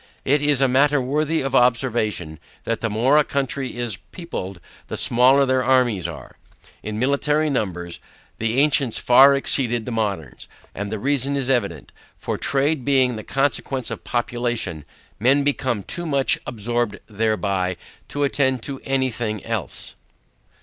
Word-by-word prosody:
It 140 Hz, +2 st, +3 dB
is 145 Hz, -2 st, +2 dB
a 135 Hz, -, +5 dB
matter 140 Hz, +3 st, +3 dB
worthy 150 Hz, +5 st, 0 dB
of 135 Hz, -1 st, -3 dB
observation, 115 Hz, -, +1 dB, 0.2 s
that 115 Hz, -1 st, -2 dB
the 115 Hz, -, -1 dB
more 125 Hz, +8 st, +3 dB
a -, -, +4 dB
country 135 Hz, -2 st, -3 dB
is 120 Hz, -5 st, -2 dB
peopled, 100 Hz, -, -6 dB, 0.3 s
the -, -, -5 dB
smaller 130 Hz, +4 st, +5 dB
their 130 Hz, -1 st, +1 dB
armies 120 Hz, -8 st, +2 dB
are. 80 Hz, -4 st, -10 dB, 0.4 s
In 110 Hz, 0 st, -5 dB
military 145 Hz, +4 st, +1 dB
numbers, 90 Hz, -8 st, -3 dB, 0.4 s
the 115 Hz, +3 st, 0 dB
ancients 140 Hz, -4 st, +3 dB
far 135 Hz, +3 st, +6 dB
exceeded 120 Hz, -4 st, +1 dB
the 125 Hz, -, -5 dB
moderns: 105 Hz, -7 st, -3 dB, 0.3 s
and 100 Hz, +1 st, -5 dB
the 110 Hz, -, -2 dB
reason 140 Hz, +3 st, 0 dB
is 135 Hz, -1 st, 0 dB
evident, 100 Hz, -, -1 dB, 0.3 s
for -, -, -3 dB
trade 140 Hz, +1 st, 0 dB
being 130 Hz, -2 st, +2 dB
the 110 Hz, -, -7 dB
consequence 135 Hz, -1 st, -1 dB
of -, -, -6 dB
population, 120 Hz, -, -2 dB, 0.3 s
men 135 Hz, +6 st, +3 dB
become 130 Hz, -6 st, -1 dB
too 175 Hz, -, -5 dB
much 140 Hz, -5 st, +2 dB
absorbed 120 Hz, -1 st, -2 dB
thereby 100 Hz, -4 st, -1 dB, 0.3 s
to 145 Hz, -, -2 dB
attend 130 Hz, -3 st, +1 dB
to 135 Hz, -2 st, -6 dB
any 130 Hz, -1 st, 0 dB
thing 110 Hz, -3 st, -4 dB
else. -, -, -3 dB
125 Hz, 150 wpm, -22 LUFS, 110-140 Hz, 0.4 s, far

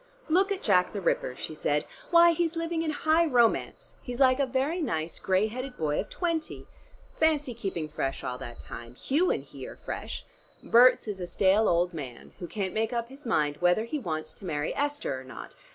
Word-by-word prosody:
"Look 380 Hz, +5 st, +3 dB
at 390 Hz, -, -2 dB
Jack 180 Hz, -4 st, +3 dB
the 205 Hz, -, -2 dB
Ripper," 130 Hz, -8 st, 0 dB
she -, -, -5 dB
said. 150 Hz, -1 st, 0 dB, 0.2 s
"Why, 340 Hz, 0 st, +7 dB
he's 335 Hz, 0 st, 0 dB
living 330 Hz, 0 st, -1 dB
in 325 Hz, -, -1 dB
high 315 Hz, +2 st, +2 dB
romance, 240 Hz, -5 st, +1 dB
he's 245 Hz, 0 st, -6 dB
like 260 Hz, -1 st, +5 dB
a 275 Hz, -, +2 dB
very 270 Hz, +7 st, 0 dB
nice 160 Hz, -, -2 dB
gray 190 Hz, +2 st, +2 dB
headed 250 Hz, +4 st, -5 dB
boy 150 Hz, -2 st, 0 dB
of -, -, -3 dB
twenty. 335 Hz, -3 st, -2 dB, 0.5 s
Fancy 295 Hz, -, +2 dB
keeping 190 Hz, -8 st, -4 dB
fresh 135 Hz, -3 st, -3 dB
all 125 Hz, 0 st, -4 dB
that 120 Hz, 0 st, -8 dB
time! 120 Hz, +1 st, -9 dB
Hugh 305 Hz, -, +1 dB
and -, -, 0 dB
he -, -, -9 dB
are -, -, -9 dB
fresh. -, -, -6 dB, 0.4 s
Berts 245 Hz, 0 st, +6 dB
is 205 Hz, -3 st, -4 dB
a 175 Hz, -, -3 dB
stale 195 Hz, +4 st, +3 dB
old 175 Hz, +1 st, +2 dB
man, 135 Hz, -7 st, -8 dB
who 175 Hz, -, -5 dB
can't 195 Hz, -2 st, -3 dB
make 220 Hz, +1 st, 0 dB
up 235 Hz, -1 st, -2 dB
his 270 Hz, 0 st, -11 dB
mind 150 Hz, -8 st, +1 dB
whether 180 Hz, +4 st, +3 dB
he 265 Hz, +6 st, -3 dB
wants 155 Hz, -, -4 dB
to 200 Hz, -, -12 dB
marry 150 Hz, -3 st, -2 dB
Esther 290 Hz, -, -2 dB
or -, -, -11 dB
not. 130 Hz, -, -10 dB
225 Hz, 205 wpm, -28 LUFS, -, 0.5 s, Why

